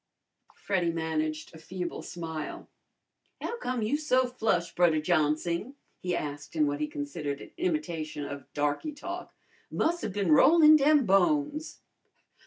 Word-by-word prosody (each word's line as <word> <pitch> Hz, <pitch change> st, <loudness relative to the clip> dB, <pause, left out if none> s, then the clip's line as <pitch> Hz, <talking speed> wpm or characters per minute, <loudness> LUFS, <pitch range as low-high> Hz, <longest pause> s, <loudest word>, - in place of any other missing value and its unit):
Freddy 180 Hz, -4 st, 0 dB
managed 155 Hz, -1 st, -2 dB
a 160 Hz, -, -11 dB
feeble 180 Hz, +2 st, -5 dB
smile. 160 Hz, -3 st, -6 dB, 0.7 s
"How 475 Hz, -, -4 dB
come 250 Hz, -, -2 dB
you 225 Hz, +7 st, +1 dB
so 260 Hz, -4 st, +2 dB
flush, 220 Hz, -8 st, -1 dB
Brudder 170 Hz, -3 st, +3 dB
Johnsing?" 170 Hz, -, 0 dB, 0.2 s
he 180 Hz, -1 st, -2 dB
asked 145 Hz, 0 st, -5 dB
in 155 Hz, -2 st, +3 dB
what 145 Hz, 0 st, -1 dB
he 150 Hz, -, -1 dB
considered 145 Hz, 0 st, -4 dB
an -, -, -11 dB
imitation 170 Hz, -, -2 dB
of 140 Hz, -2 st, -8 dB
darky 145 Hz, -, -1 dB
talk. 345 Hz, +5 st, -7 dB, 0.4 s
"Mus' 340 Hz, +1 st, 0 dB
'a' 220 Hz, -, -1 dB
bin 195 Hz, -3 st, -1 dB
rollin' 310 Hz, -, +7 dB
dem 295 Hz, -2 st, +4 dB
bones!" 295 Hz, -, +1 dB
175 Hz, 140 wpm, -29 LUFS, -, 0.7 s, rollin